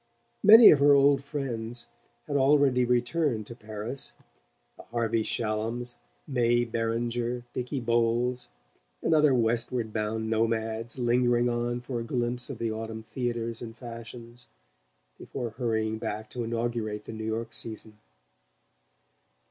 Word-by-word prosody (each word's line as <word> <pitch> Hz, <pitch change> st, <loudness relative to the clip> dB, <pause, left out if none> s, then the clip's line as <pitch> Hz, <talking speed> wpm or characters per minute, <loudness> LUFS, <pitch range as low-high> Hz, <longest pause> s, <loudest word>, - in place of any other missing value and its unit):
Many 220 Hz, +3 st, +10 dB
of 145 Hz, -, +4 dB
her 145 Hz, 0 st, +6 dB
old 140 Hz, 0 st, +4 dB
friends 120 Hz, -5 st, -4 dB, 0.4 s
had 145 Hz, -, -4 dB
already 135 Hz, -2 st, +4 dB
returned 125 Hz, -1 st, 0 dB
to 120 Hz, -, -9 dB
Paris: 110 Hz, +3 st, -6 dB, 0.6 s
the -, -, -12 dB
Harvey 115 Hz, -1 st, 0 dB
Shallums, 115 Hz, +2 st, -2 dB, 0.3 s
May 120 Hz, -2 st, +2 dB
Beringer, 120 Hz, +1 st, -2 dB
Dicky 125 Hz, +2 st, -3 dB
Bowles 120 Hz, -, 0 dB, 0.5 s
and -, -, +2 dB
other 150 Hz, -3 st, +5 dB
westward 115 Hz, -1 st, 0 dB
bound 110 Hz, +1 st, -2 dB
nomads 115 Hz, +1 st, -1 dB
lingering 120 Hz, 0 st, +2 dB
on 120 Hz, 0 st, -1 dB
for 125 Hz, -1 st, -4 dB
a -, -, -3 dB
glimpse 120 Hz, +1 st, -2 dB
of -, -, -5 dB
the 115 Hz, -1 st, -2 dB
autumn 110 Hz, 0 st, -5 dB
theatres 115 Hz, -1 st, -3 dB
and 115 Hz, -1 st, -8 dB
fashions 120 Hz, 0 st, -10 dB, 0.7 s
before 120 Hz, -4 st, -5 dB
hurrying 110 Hz, -2 st, -1 dB
back 110 Hz, +1 st, -5 dB
to 120 Hz, -, -3 dB
inaugurate 115 Hz, -2 st, -3 dB
the -, -, -7 dB
New 110 Hz, 0 st, -6 dB
York 115 Hz, +1 st, -3 dB
season. 110 Hz, -2 st, -7 dB
120 Hz, 130 wpm, -28 LUFS, 115-125 Hz, 0.7 s, Many